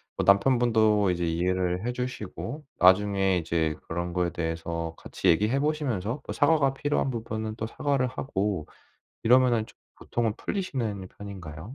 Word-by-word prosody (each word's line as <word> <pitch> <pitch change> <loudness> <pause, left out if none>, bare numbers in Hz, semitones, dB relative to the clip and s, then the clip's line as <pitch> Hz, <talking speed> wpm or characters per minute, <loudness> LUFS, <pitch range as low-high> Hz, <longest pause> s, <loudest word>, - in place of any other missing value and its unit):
뭐 - - -1
남편분도 110 -1 +4
이제 85 -1 0
이해를 90 +4 0
해 - - +1
주시고 125 +4 -5
나중에 95 0 +4
이제 80 -1 0
그런 85 +1 -3
거에 90 -1 +1
대해서 85 0 -3
같이 - - -4
얘기해 105 +10 +3
보시면서 140 -6 -1
또 - - -6
사과가 145 -3 +3
필요한 145 -1 0
부분은 110 -2 -4
또 110 - -4
사과를 135 +3 0
하고 105 - -2 0.6
이러면은 120 -1 +4
쪼 - - -17 0.2
보통은 115 -3 -1
풀리시는 120 - -3
편인가요? 95 - -8
105 Hz, 340 characters per minute, -27 LUFS, 90-125 Hz, 0.6 s, 남편분도